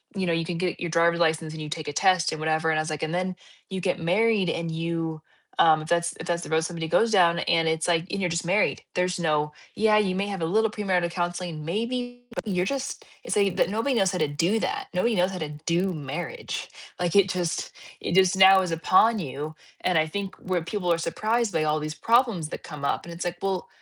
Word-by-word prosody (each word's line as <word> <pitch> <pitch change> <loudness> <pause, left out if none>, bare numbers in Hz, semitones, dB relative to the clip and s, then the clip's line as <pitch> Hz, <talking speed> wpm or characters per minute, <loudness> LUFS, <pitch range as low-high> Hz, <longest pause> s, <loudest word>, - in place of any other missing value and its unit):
you 190 -1 -1
know, 170 - +1
you 165 0 0
can 170 -1 -3
get 180 0 -2
your 170 - -3
driver's 170 0 +3
license 160 -1 +1
and 160 0 -7
you 150 - -5
take 155 -2 -4
a - - -5
test 185 -1 +3
and 155 - -5
whatever, 160 +1 +1
and 155 -1 +2
I - - +2
was 155 - -4
like, 155 0 -4
and 160 +2 -2
then 185 +1 -1 0.3
you 190 -1 -4
get 185 0 0
married 195 +2 +2
and 165 0 -2
you, 165 -1 -3 0.4
um, 155 -1 +6
if 155 - -8
that's 170 0 +1
if - - -7
that's 170 0 -1
the - - -8
road 160 0 +2
somebody 165 -1 -4
goes 225 +7 +3
down, 170 -4 +4
and 165 -1 +2
it's 160 0 0
like, 170 -1 +2
and 200 - -2
you're 180 - +1
just 170 +1 -2
married. 195 +4 +1
There's 180 0 0
no, 150 -2 +1 0.2
"Yeah, 215 0 +4
you 190 -3 +1
may 200 +1 -1
have 195 -4 -4
a - - +1
little 220 +6 +2
premarital 185 -5 0
counseling 175 -2 -3
maybe, 245 +6 -3
but - - -5
you're 180 -2 0
just" 275 +2 -3 0.2
it's - - -2
like 200 -3 +2
that - - +3
nobody 230 +5 0
knows 190 -4 +3
how 180 - -2
to 155 -3 +1
do 170 +10 +1
that. - - -2
Nobody 220 +5 +1
knows 180 +1 +2
how 185 - -5
to 155 -2 -3 0.2
do 180 +2 +1
marriage. 155 - -5 0.3
Like, 175 +1 -1
it 195 -2 +5
just 175 -3 -2 0.3
it - - -2
just 190 0 +5
now 190 0 +8
is 180 -2 -2
upon 185 +7 +4
you, 150 0 -5 0.3
and 180 -3 +2
I 155 0 +3
think 195 +3 -4
where 185 -2 -2
people 180 -1 -2
are 165 - +3
surprised 215 +7 -1
by 160 -1 +1
all 155 0 +1
these 155 0 -5
problems 230 -9 +2
that - - -7
come 150 -3 -9
up, - - -1
and 170 - -8
it's 170 - -5
like, 175 0 -3
well, 195 -2 -2
175 Hz, 250 wpm, -26 LUFS, 160-195 Hz, 0.4 s, now